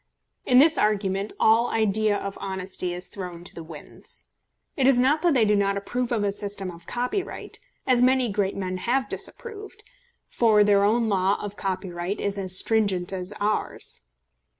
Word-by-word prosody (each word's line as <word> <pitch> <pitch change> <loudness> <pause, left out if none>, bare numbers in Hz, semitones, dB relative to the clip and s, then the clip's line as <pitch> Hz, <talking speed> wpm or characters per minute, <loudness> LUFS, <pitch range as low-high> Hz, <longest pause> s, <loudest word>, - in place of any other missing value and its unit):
In 250 - +5
this 310 +4 +6
argument 200 -1 0
all 225 +2 +4
idea 215 -1 +2
of 200 0 -5
honesty 185 -1 -4
is 180 +1 -3
thrown 180 -3 -7
to - - -10
the 170 - -8
winds. 160 -2 -10 0.5
It 265 -2 +2
is 270 -2 +5
not 275 +5 +3
that 345 -5 +3
they 235 -4 +4
do 210 0 +3
not 200 0 +1
approve 240 +5 -3
of 225 -3 +1
a 200 - +1
system 200 -2 -4
of 170 0 -14
copyright, 250 +11 -3 0.3
as 250 -2 +3
many 255 0 +4
great 200 -2 -1
men 185 -1 -3
have 255 +7 0
disapproved, 425 +5 -8 0.4
for 220 -3 +4
their 200 -1 +4
own 225 +3 +2
law 195 -1 +2
of 205 -1 -6
copyright 185 -1 -3
is 200 0 -2
as 185 -1 +1
stringent 195 -5 +1
as 180 -1 -4
is 205 - -8
ours. 210 +1 -2
205 Hz, 175 wpm, -25 LUFS, 190-240 Hz, 0.5 s, this